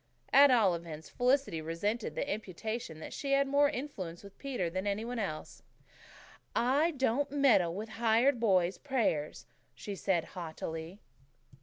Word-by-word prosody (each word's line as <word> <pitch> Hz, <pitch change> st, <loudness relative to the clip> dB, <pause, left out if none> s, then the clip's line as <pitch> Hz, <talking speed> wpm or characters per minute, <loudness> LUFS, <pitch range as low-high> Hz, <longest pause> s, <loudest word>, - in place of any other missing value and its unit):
At 280 Hz, +1 st, +8 dB
all 220 Hz, -8 st, +4 dB
events, 165 Hz, -2 st, -7 dB
Felicity 250 Hz, -, +1 dB
resented 205 Hz, +8 st, -2 dB
the -, -, -2 dB
imputation 215 Hz, -2 st, -4 dB
that -, -, -7 dB
she 275 Hz, -1 st, -2 dB
had 275 Hz, 0 st, +3 dB
more 285 Hz, +1 st, +4 dB
influence 205 Hz, -, -6 dB
with 200 Hz, -1 st, -13 dB
Peter 255 Hz, -10 st, -2 dB
than 185 Hz, +4 st, -3 dB
any 205 Hz, +2 st, -1 dB
one 245 Hz, 0 st, -4 dB
else. 155 Hz, -8 st, -5 dB, 0.9 s
"I 275 Hz, +7 st, +3 dB
don't 265 Hz, +2 st, +1 dB
meddle 245 Hz, -12 st, +3 dB
with 215 Hz, +3 st, -5 dB
hired 235 Hz, +3 st, +4 dB
boys' 185 Hz, -5 st, +2 dB
prayers," 230 Hz, -, -1 dB, 0.3 s
she 205 Hz, -, -6 dB
said 185 Hz, -3 st, 0 dB
haughtily. 165 Hz, +1 st, -6 dB
215 Hz, 145 wpm, -32 LUFS, 175-265 Hz, 0.9 s, At